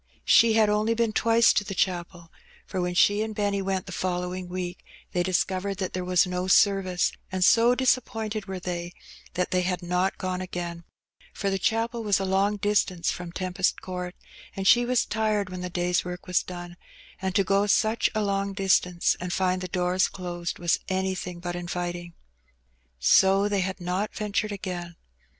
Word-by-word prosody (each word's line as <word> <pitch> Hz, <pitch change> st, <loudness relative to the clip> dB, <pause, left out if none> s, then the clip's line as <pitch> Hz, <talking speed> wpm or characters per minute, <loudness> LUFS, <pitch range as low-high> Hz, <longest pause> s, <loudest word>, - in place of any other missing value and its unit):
She 230 Hz, -1 st, +6 dB
had 220 Hz, -1 st, +4 dB
only 210 Hz, +2 st, +1 dB
been 230 Hz, -1 st, 0 dB
twice 230 Hz, +1 st, +4 dB
to -, -, +1 dB
the 195 Hz, -1 st, -6 dB
ohapel^ 175 Hz, -2 st, -2 dB, 0.4 s
for 185 Hz, -, -3 dB
when 180 Hz, 0 st, -2 dB
she 205 Hz, +3 st, +4 dB
and 220 Hz, -1 st, -3 dB
Benny 205 Hz, -1 st, 0 dB
went 190 Hz, -1 st, -2 dB
the -, -, -9 dB
following 180 Hz, 0 st, -3 dB
week 180 Hz, 0 st, -5 dB, 0.3 s
they 180 Hz, -, 0 dB
dis 185 Hz, 0 st, +2 dB
covered 195 Hz, +1 st, -4 dB
that 185 Hz, -1 st, -3 dB
there 185 Hz, -, -2 dB
was 180 Hz, 0 st, +3 dB
no 180 Hz, 0 st, -2 dB
service^ 190 Hz, -2 st, +3 dB, 0.2 s
and 185 Hz, -1 st, +2 dB
so 235 Hz, +3 st, +5 dB
disappointed 225 Hz, -5 st, 0 dB
were 190 Hz, -1 st, -4 dB
they 175 Hz, -1 st, -5 dB, 0.4 s
that 180 Hz, -, -1 dB
they 185 Hz, -, +2 dB
had 180 Hz, 0 st, -2 dB
not 180 Hz, +2 st, 0 dB
gone 185 Hz, 0 st, -3 dB
again; 175 Hz, -2 st, -5 dB, 0.5 s
for 200 Hz, -1 st, -1 dB
the 195 Hz, -, -1 dB
chapel 230 Hz, +3 st, 0 dB
was 205 Hz, -3 st, +2 dB
a 195 Hz, -, -1 dB
long 195 Hz, +2 st, +1 dB
distance 200 Hz, -4 st, +1 dB
from 175 Hz, -1 st, -6 dB
Tempest 185 Hz, +1 st, -1 dB
Court, 180 Hz, -1 st, -5 dB, 0.4 s
and 195 Hz, -, -4 dB
she 240 Hz, 0 st, +6 dB
was 250 Hz, -1 st, +2 dB
tired 210 Hz, -3 st, -1 dB
when 185 Hz, 0 st, -6 dB
the 180 Hz, -, -4 dB
day's 175 Hz, 0 st, 0 dB
work 180 Hz, 0 st, -7 dB
was 180 Hz, -1 st, +2 dB
done, 175 Hz, -1 st, -8 dB, 0.4 s
and 190 Hz, -1 st, -2 dB
to 195 Hz, -, +4 dB
go 200 Hz, +2 st, +2 dB
such 220 Hz, +2 st, +2 dB
a 215 Hz, -, +1 dB
long 200 Hz, 0 st, -1 dB
distance 185 Hz, -3 st, +2 dB
and 180 Hz, 0 st, -4 dB
find 185 Hz, 0 st, 0 dB
the 185 Hz, -, -4 dB
doors 180 Hz, +1 st, +1 dB
closed 175 Hz, -2 st, -5 dB
was 175 Hz, -1 st, +1 dB
anything 185 Hz, -2 st, -2 dB
but 175 Hz, 0 st, -4 dB
inviting. 175 Hz, -1 st, -4 dB, 0.8 s
So 190 Hz, -, +4 dB
they 200 Hz, -2 st, 0 dB
had 190 Hz, +1 st, -3 dB
not 180 Hz, +4 st, -2 dB
ventured 215 Hz, 0 st, -1 dB
again. 175 Hz, -3 st, -5 dB
185 Hz, 185 wpm, -26 LUFS, 180-205 Hz, 0.8 s, She